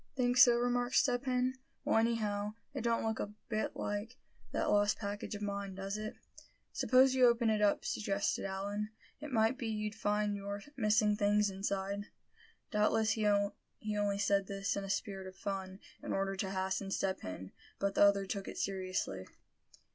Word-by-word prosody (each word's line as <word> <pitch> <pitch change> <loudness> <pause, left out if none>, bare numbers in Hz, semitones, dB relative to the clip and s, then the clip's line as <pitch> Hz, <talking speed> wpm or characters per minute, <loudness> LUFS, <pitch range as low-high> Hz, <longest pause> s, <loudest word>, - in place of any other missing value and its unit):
"Think 245 -2 +2
so?" 240 -1 +8
remarked 245 +1 0
Step 250 -2 +3
Hen. 255 0 0 0.3
"Well, - - +3
anyhow, 215 -2 0 0.2
it 270 - -3
don't 230 0 +1
look 220 0 -1
a 205 0 -4
bit 215 -1 -1
like 205 +4 -3 0.3
that - - 0
lost 205 0 +3
package 205 0 -4
of 205 - -5
mine, 200 -1 -3
does 195 +1 -4
it?" 215 0 -5 0.6
"Suppose 260 +1 +5
you 255 -1 +6
open 235 -1 +3
it 215 -1 +1
up," 205 -1 +2
suggested 200 -1 -1
Allan; 200 +2 -3 0.3
"it 300 0 -7
might 225 +2 +2
be 235 - -3
you'd 215 -1 -2
find 210 0 0
your 200 0 -5
missing 215 -3 +3
things 205 0 +2
inside." 195 +1 -2 0.6
Doubtless 215 0 +3
he 220 -1 +1
only 205 0 -1
said 200 -1 +2
this 195 0 -2
in 200 - -3
a 195 - -6
spirit 195 -1 -2
of 185 - -10
fun, 190 -2 -4 0.2
in - - -3
order 195 0 0
to 190 0 -2
hasten 190 +1 -2
Step 195 -1 -1
Hen; 95 0 -7 0.3
but 200 0 0
the - - +1
other 200 -1 +5
took 195 0 -4
it - - -6
seriously. 185 - -2
205 Hz, 175 wpm, -34 LUFS, 195-220 Hz, 0.6 s, so